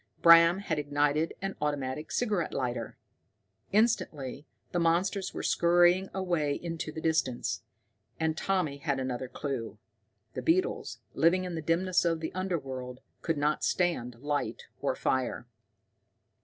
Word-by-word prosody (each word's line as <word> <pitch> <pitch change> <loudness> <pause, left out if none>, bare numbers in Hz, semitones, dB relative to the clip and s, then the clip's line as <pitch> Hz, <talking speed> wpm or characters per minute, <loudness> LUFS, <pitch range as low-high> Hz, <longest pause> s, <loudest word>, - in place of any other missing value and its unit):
Bram 170 +1 +8
had 160 -6 -1
ignited 145 +2 +1
an 195 0 -2
automatic 145 0 -2
cigarette 210 -8 0
lighter! 120 -3 -3 0.7
Instantly 155 - 0 0.2
the 175 - 0
monsters 185 +4 +1
went - - -5
scurrying 175 +2 +4
away 175 -7 0
into 165 -1 -4
the 160 - -6
distance. 160 -7 0 0.6
And 160 -1 +1
Tommy 170 -5 0
had 140 -3 -1
another 130 0 -3
clue. 115 -6 -4 0.6
The - - -4
beetles, 370 +7 +1 0.2
living 175 +3 +3
in 180 -1 -4
the 160 - -3
dimness 175 +4 +2
of 165 -2 +1
the 160 - -4
underworld, 135 -9 -4 0.2
could 165 -2 -1
not 150 +1 +1
stand 165 -10 0
light 145 +4 -2 0.2
or - - 0
fire! 130 -2 -1
160 Hz, 130 wpm, -30 LUFS, 140-175 Hz, 0.7 s, Bram